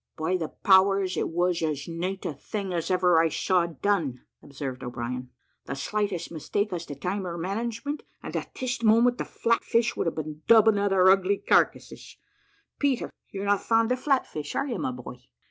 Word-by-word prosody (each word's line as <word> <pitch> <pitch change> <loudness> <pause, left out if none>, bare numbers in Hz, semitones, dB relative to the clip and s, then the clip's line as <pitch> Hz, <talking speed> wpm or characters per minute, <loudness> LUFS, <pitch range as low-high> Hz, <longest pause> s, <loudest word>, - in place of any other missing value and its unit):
"By 160 +3 0
the 165 -4 -2
powers, 190 +1 +3
it - - -1
was 175 +1 0
as 150 -3 -2
nate 180 +3 -4
a - - -2
thing 195 +6 -5
as 170 -2 -2
ever 180 -2 +4
I 165 0 +3
saw 180 +1 +1
done," 165 -6 -1 0.2
observed 135 -2 -6
O'Brien; 125 +1 -5 0.4
"the 135 - -3
slightest 200 +4 -2
mistake 200 +5 -2
as 170 -1 -4
to 145 - -6
time 185 +6 -3
or 170 0 -4
management, 230 - -3 0.2
and - - -6
at - - -4
this 250 -2 -2
moment 235 +2 +4
the - - -2
flatfish 230 0 +1
would - - -1
have 165 - -1
been 155 -1 -6
dubbing 220 -2 +6
at 200 0 +1
our 185 -1 +6
ugly 195 +1 +3
carcasses. - - 0 0.6
Peter, 275 -4 0 0.2
you're 195 0 -5
not 200 -1 +2
fond 225 +1 +2
of 250 - +1
flatfish, 255 - -1
are - - 0
you, 250 -5 -3
my - - -1
boy? 125 0 -9
185 Hz, 185 wpm, -26 LUFS, 160-215 Hz, 0.6 s, dubbing